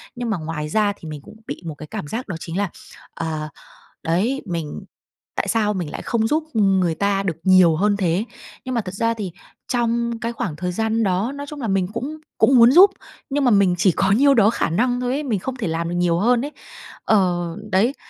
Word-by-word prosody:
Nhưng 240 -1 -3
mà 205 - 0
ngoài 155 -1 -4
ra 205 +3 +2
thì 165 - -11
mình 150 -2 -7
cũng - - -14
bị - - -6
một 160 - -5
cái 150 +1 -10
cảm 150 - -6
giác 225 - -4
đó 185 - -4
chính 165 +3 -5
là, 200 -1 0 0.5
ờ 155 -2 -3 0.5
đấy, 210 +12 0
mình 165 -4 -5 0.5
tại - - -1
sao 210 -2 +1
mình 175 -5 -3
lại - - -6
không 225 -2 0
giúp 310 +1 +1
người 190 -5 +2
ta 200 +2 0
được 175 -5 -2
nhiều 185 -4 +6
hơn 205 +3 +2
thế? 185 +1 0 0.4
Nhưng 255 -1 -3
mà 235 - +1
thật 190 -2 -7
ra 230 +3 0
thì 200 -5 -5 0.4
trong 235 -1 0
cái 230 +1 -2
khoảng 180 -9 -4
thời 180 +2 -3
gian 220 +3 0
đó, 195 +6 0
nói 285 0 -7
chung 295 0 -8
là 230 - -3
mình 195 -2 +1
cũng 280 +7 -4 0.2
cũng 265 - +5
muốn 235 +1 +8
giúp, 380 +6 +8 0.4
nhưng 285 0 0
mà 250 - +4
mình 200 -4 +4
chỉ 185 0 +4
có 190 +4 +1
nhiêu 275 +7 +5
đó 215 -3 +5
khả 170 - -1
năng 245 +7 +1
thôi 250 0 -1
ấy, 290 - -1
mình 240 -8 -1
không 260 +3 -5
thể 235 - -3
làm 165 +1 -2
được 175 - -3
nhiều 175 -1 +2
hơn 240 +4 +2
ấy. 295 - -6 0.5
Ờ, 180 -5 +2 0.2
đấy, 220 +8 +3
205 Hz, 230 wpm, -21 LUFS, 175-235 Hz, 0.5 s, muốn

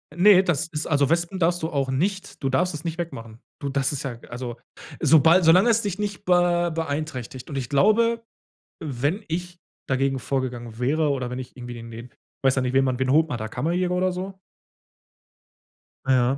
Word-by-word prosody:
Ne, 190 +1 +6
das 160 -3 0
ist 155 -2 -4
also, 140 -2 +2
Wespen 170 +3 0
darfst 175 +1 +1
du 160 - -2
auch 140 -4 -1
nicht 190 +3 -2
du 135 - +1
darfst 180 +6 +1
es 150 +2 -6
nicht 165 0 -4
wegmachen. 115 -10 -6 0.2
Du 140 - -3
das 135 +1 0
ist 140 - -4
ja 125 -4 -5
also, 120 -1 -6 0.4
sobald 160 +4 +5
solange 185 +8 +6
es 230 0 +3
dich 200 0 -3
nicht 205 -1 -4
be 175 -1 +3
beeinträchtigt. 145 -5 -4
Und 140 - -4
ich 125 -3 -3
glaube, 230 +9 +3 0.6
wenn 145 - -2
ich 175 +1 -4 0.3
dagegen 135 0 +1
vorgegangen 120 -2 -4
wäre 150 +4 +1
oder 130 -3 -2
wenn 125 - -5
ich 130 - -9
irgendwie 120 -1 -8
den 115 0 -9
den 120 +2 -9 0.3
weiß 135 0 +4
ja 130 - +1
nicht, 125 +1 -1
wen 135 0 +4
man 130 -1 0
wen 130 0 0
holt 160 +2 +4
man 125 - -3
da? 110 -1 -4
Kammerjäger 175 +8 -1
oder 185 +1 +1
so? 190 +1 -6 1.7
Ah, 135 - +1
ja. 130 +2 +2
150 Hz, 200 wpm, -24 LUFS, 130-175 Hz, 1.7 s, Ne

